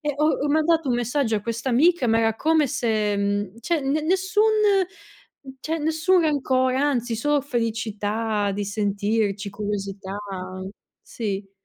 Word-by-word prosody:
e 295 -2 -1
ho 300 - +1 0.2
ho - - 0
mandato 315 0 +2
un 245 - +2
messaggio 245 -1 0
a - - -2
questa 230 +4 -3
amica 280 +3 +3
ma 225 0 +3
era 225 -1 +2
come 315 +4 +2
se 220 -5 0
uhm, 200 +1 -2
cioè 335 +4 0
ne 275 +3 0
nessun 380 +5 +1 1.2
cioè 320 +4 -2
nessun 320 +4 +2
rancore, 260 -4 +1
anzi 260 -4 0
solo 295 +5 +1
felicità 220 -4 -1
di 205 +1 -3
sentirci, 205 0 -1
curiosità 200 -1 -4 0.9
sì. 200 -3 -5
235 Hz, 140 wpm, -23 LUFS, 210-295 Hz, 1.2 s, amica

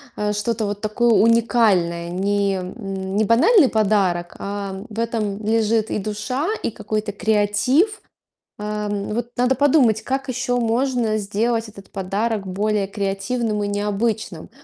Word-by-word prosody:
э, 210 0 -1
что-то 215 +2 -1
вот 205 0 -3
такое 225 +3 +1
уникальное, 215 -7 +3
не 200 +2 0
м, 190 0 -5
не 215 - +3
банальный 295 - +5
подарок, 195 -5 +1
а 200 -1 -5
в 220 - -11
этом 215 -3 -2
лежит 220 0 +1
и - - 0
душа, 215 - -3 0.2
и - - -1
какой-то 215 0 -3
креатив. 220 - +1 0.6
А, 210 0 -3
вот 210 +4 -3
надо 250 +2 +2
подумать, 260 -6 +3
как 270 +2 -2
еще 255 0 -1
можно 235 -1 +1
сделать 225 +2 -1
этот 195 -2 -14
подарок 200 +2 -2
более 200 +2 -1
креативным 205 +2 -2
и - - -1
необычным. 205 -3 -2
210 Hz, 135 wpm, -21 LUFS, 200-230 Hz, 0.6 s, банальный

